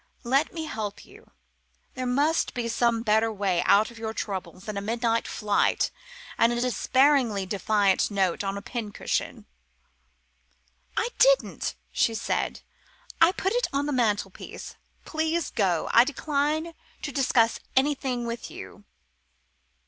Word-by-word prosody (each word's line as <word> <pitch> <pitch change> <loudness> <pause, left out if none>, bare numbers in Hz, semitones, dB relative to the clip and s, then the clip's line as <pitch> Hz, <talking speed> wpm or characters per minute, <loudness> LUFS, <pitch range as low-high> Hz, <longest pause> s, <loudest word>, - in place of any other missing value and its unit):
Let 270 +5 +2
me 325 -2 -5
help 215 -7 -5
you. 430 +3 -17 0.6
There 255 -1 -3
must 290 +6 +1
be 240 -1 -2
some 230 0 +1
better 220 0 +3
way 195 -4 0
out 215 +3 +5
of 230 - -13
your 220 0 -4
troubles 190 -2 -5
than 215 - -5
a 200 - -2
midnight 230 +2 0
flight 210 -2 +1 0.5
and 230 - +5
a 240 - -1
despairingly 250 -3 +2
defiant 200 0 +2
note 195 -3 0
on 195 0 -2
the 200 - -6
pin 225 -4 -5
cushion." - - -3 1.5
"I 470 - +1
didn't," - - +3 0.2
she 225 - +1
said. - - -2 0.6
"I 330 +2 +7
put 385 +1 -1
it - - +1
on 280 +1 0
the 295 - -1
mantelpiece. 210 -6 -2 0.3
Please 320 0 -1
go. 185 -7 +1
I 235 - +8
decline 300 +4 -1 0.3
to 290 - -3
discuss 245 -4 +2 0.2
anything 265 -3 +1
with 235 0 -5
you." 205 - -11
235 Hz, 140 wpm, -26 LUFS, 210-285 Hz, 1.5 s, I